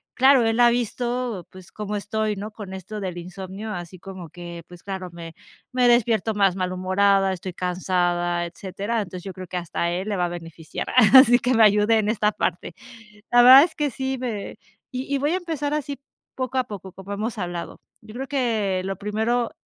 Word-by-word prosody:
claro, 260 -1 +5
él 225 +1 +1
ha 240 0 +7
visto, 240 -3 -2
pues, 185 -1 -14
cómo 210 0 -5
estoy, 215 +1 -2
¿no? 210 +2 -6
Con 205 -3 -9
esto 205 +3 -7
del 185 -3 -4
insomnio, 190 +4 -7
así 175 +1 -7
como 185 -3 -9
que, 170 0 -9
pues, 175 -1 -14
claro, 190 -2 -5
me 165 -1 -9 0.4
me 250 -1 +3
despierto 225 -2 +2
más 195 -3 +3
malhumorada, 190 +1 +2
estoy 185 0 -6
cansada, 175 -1 0
etcétera. 195 +6 -4
Entonces, 185 -3 -7
yo 195 - -6
creo 185 -1 -9
que 180 - -4
hasta 175 -1 -3
a 170 - +1
él 185 +4 -3
le 205 - -1
va 180 - +1
a - - -2
beneficiar, 165 -2 -7 0.3
así 245 -2 +9
que 255 0 +1
me 225 -2 +5
ayude 210 +1 +4
en 210 - 0
esta 210 -1 +2
parte. 180 -1 -3 0.6
La 245 0 +7
verdad 260 +3 +10
es 320 -1 -3
que 295 -2 -1
sí 265 +1 -3
me 230 -5 -5 0.3
y 260 +2 -4
y - - +2
voy 290 +3 +1
a 370 - +2
empezar 305 -5 -3
así 285 -2 -3 0.4
poco 260 0 -3
a 255 - +3
poco, 195 -4 -9
como 195 +1 -8
hemos 215 +3 -3
hablado. 175 -3 -5 0.2
Yo 215 - -13
creo 265 +2 -4
que 225 -9 0
lo 195 0 -2
primero 220 +3 -1
205 Hz, 200 wpm, -23 LUFS, 185-240 Hz, 0.6 s, verdad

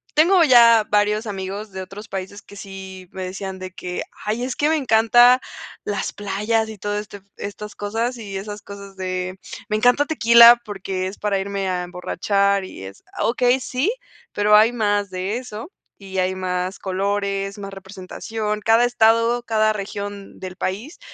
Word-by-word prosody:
tengo 340 +3 +5
ya 235 -5 +7
varios 210 +2 +2
amigos 200 +1 -5
de 190 0 -6
otros 195 +4 -9
países 195 +1 -6
que 205 - -15
sí 190 -1 -9
me 190 -1 -6
decían 190 +1 -6
de 185 0 -7
que: 180 -1 -5 0.2
"Ay, 220 +4 -1
es 255 - -3
que 295 - +1
me 320 - +3
encanta 240 0 +5 0.4
las 205 - -3
playas 210 +3 -1
y 220 - -8
todo 205 +1 -3
este 205 -1 -9 0.2
estas 210 +1 -7
cosas 225 +4 -2
y 200 -4 -6
esas 205 +1 -7
cosas 200 -1 -11
de 185 0 -4 0.3
me 215 - +1
encanta 245 +6 +4
Tequila 235 -5 +7
porque 190 -3 -4
es 190 - -7
para 205 -2 0
irme 195 0 -3
a 180 -1 -1
emborrachar 195 +2 0
y 140 - -10
es", 95 +1 -12
ah, - - -2
okey, 245 +2 +2
sí, 260 - -1 0.4
pero 210 +1 +4
hay 220 +2 +6
más 205 -3 0
de 190 +4 -3
eso 245 - -8 0.3
y 190 -1 -8
hay 185 +1 0
más 185 0 -3
colores, 195 +1 -2
más 195 0 -7
representación. 205 +3 -5
Cada 225 +2 +4
estado, 230 0 +3
cada 215 -2 +2
región 200 0 -6
del 185 -1 -8
país 215 - -4
205 Hz, 170 wpm, -21 LUFS, 190-225 Hz, 0.4 s, ya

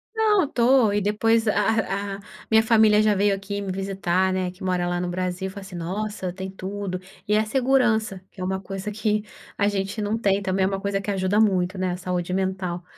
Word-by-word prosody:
Não 425 -6 +3
estou 245 -4 +3
e 205 - +1
depois 225 +2 +2
a 205 -2 0
a - - -13 0.3
minha 220 0 +5
família 220 -2 +5
já 215 -1 +3
veio 200 0 +2
aqui 200 +1 -5
me 195 -2 -3
visitar, 190 -1 0
né, 185 -1 -1
que 185 - -13
mora 180 -1 0
lá 175 0 -1
no 180 - -2
Brasil 185 +1 -2
e - - -5
falou 200 +1 -9
assim: 195 -2 -10
“Nossa, 185 +1 -4
tem 190 0 -6
tudo!”. 190 -1 -5 0.3
E 210 - +3
a 215 - +2
segurança, 235 -6 +1
que 185 - -11
é - - -2
uma 190 +1 -1
coisa 195 +2 -5
que 210 0 0 0.3
a 205 - +2
gente 200 +1 -2
não 210 +2 0
tem, 200 -3 +1
também 190 -1 0
é - - +3
uma 195 0 -2
coisa 200 -1 -1
que 205 - -3
ajuda 190 +2 +1
muito, 190 -3 +2
né, 185 -1 0
a 180 - -3
saúde 180 -1 -3
mental, 185 -2 -2
195 Hz, 220 wpm, -24 LUFS, 185-215 Hz, 0.3 s, minha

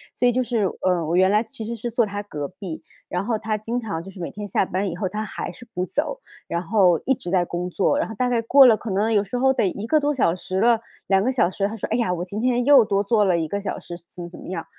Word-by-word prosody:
所 245 - +1
以 - - +4
就 255 +2 +1
是， 235 -4 0 0.2
呃， 180 -3 +1
我 165 +3 -1
原 190 +1 +5
来 210 +2 +3
其 225 -2 -9
实 235 +1 -4
是 235 +1 -5
坐 235 -1 +2
他 205 0 -5
隔 150 -8 -5
壁， 180 -2 -8 0.3
然 180 +2 -2
后 225 -2 0
他 215 0 -2
经 225 +3 -4
常 200 -8 -4
就 195 - -10
是 190 - -12
每 - - -4
天 210 0 -7
下 190 - +1
班 190 +2 -2
以 170 - -5
后， 190 0 -2
他 210 +2 -3
还 - - -5
是 240 - -14
不 180 +1 -1
走， 410 - -2 0.3
然 170 0 -2
后 180 -3 +3
一 270 - +3
直 175 - -7
在 180 -1 +3
工 175 +1 -4
作， 285 +11 +1
然 - - 0
后 220 - -8
大 250 +3 0
概 235 -2 +1
过 270 +4 +7
了 225 -3 +6
可 230 - -7
能 210 +4 +1
有 205 -1 +3
时 225 +5 -4
候 265 +1 +4
得 200 - +1
1 200 +4 -4
个 310 +3 +4
多 290 0 0
小 170 -9 +2
时 185 +1 -3
了， 230 -1 +4 0.3
2 195 -1 +3
个 260 - +1
小 180 -8 +2
时。 200 +1 -1
他 220 - -6
说， 215 - -4
诶 225 - +1
呀， 185 -7 +1
我 175 0 -3
今 200 +3 -5
天 245 0 +1
又 280 -4 +7
多 200 -1 +1
做 210 0 +3
了 180 -3 +3
1 160 -1 -1
个 200 - -2
小 200 - -4
时 175 - -8
怎 180 - -11
么 170 - -7
怎 - - -12
么 - - -10
样。 180 -2 -4
205 Hz, 320 characters per minute, -23 LUFS, 185-235 Hz, 0.3 s, 过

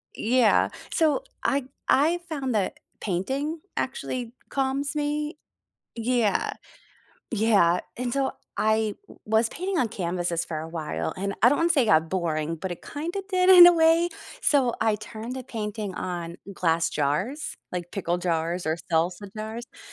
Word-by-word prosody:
Yeah, 235 -1 +3 0.2
so, 320 +9 +2 0.2
I 275 -2 +1 0.2
I 320 +6 +4
found 270 -5 -2
that 200 - -1 0.2
painting 270 - -2 0.2
actually 250 - -3 0.2
calms 275 +1 -1
me. 300 +1 -1 0.6
Yeah. 230 -2 +1 0.8
Yeah. 200 -6 +3 0.2
And, 245 0 -2
so, 275 0 0 0.3
I 220 -1 +2
w - - -15
was 220 +1 +2
painting 370 +5 -2
on 245 - +2
canvases 175 -3 -2
for 155 - -4
a 160 - -6
while, 165 -2 -3
and, 195 +1 -2
I 240 - +8
don't 290 - +2
wanna 335 +1 +2
say 300 -5 +4
it - - 0
got 160 -4 +4
boring, 165 -3 -1
but 185 +3 -4
it 175 - -10
kinda 340 +7 -4
did 370 -2 +2
in 355 -2 +11
a - - +6
way. 330 +1 +4 0.3
So, 265 -5 +3
I 220 -1 +3
turned 220 +4 -7
the 255 - -6
painting 210 -4 -4
on 175 -2 -4 0.2
glass 165 -3 +1
jars, 190 - -1 0.2
like, 175 -1 -5
pickle 175 -3 -1
jars 170 0 -1
or 160 +1 +1 0.2
salsa 175 +5 0
jars. 220 +2 -5
M - - -20
220 Hz, 160 wpm, -26 LUFS, 175-280 Hz, 0.8 s, in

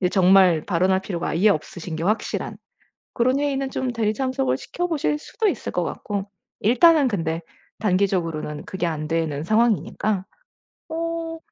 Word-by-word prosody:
이제 180 - +2
정말 185 -4 +5
발언할 190 +1 +2
필요가 180 -3 -3
아예 190 +7 +3
없으신 160 -1 -2
게 160 - -4
확실한 215 +3 -1 0.6
그런 255 +3 +2
회의는 275 -2 -1
좀 255 -2 -2
대리 220 -2 0
참석을 265 +1 0
시켜 355 - -3
보실 300 -2 0
수도 430 +7 -1
있을 - - -3
것 - - 0
같고. 200 -1 -4 0.3
일단은 275 - +5
근데 165 -5 -2 0.4
단기적으로는 180 -7 0
그게 185 -2 -3
안 155 -2 -3
되는 160 -3 -1
상황이니까. 215 -2 +1 0.7
어 330 0 -3
200 Hz, 330 characters per minute, -23 LUFS, 170-265 Hz, 0.7 s, 정말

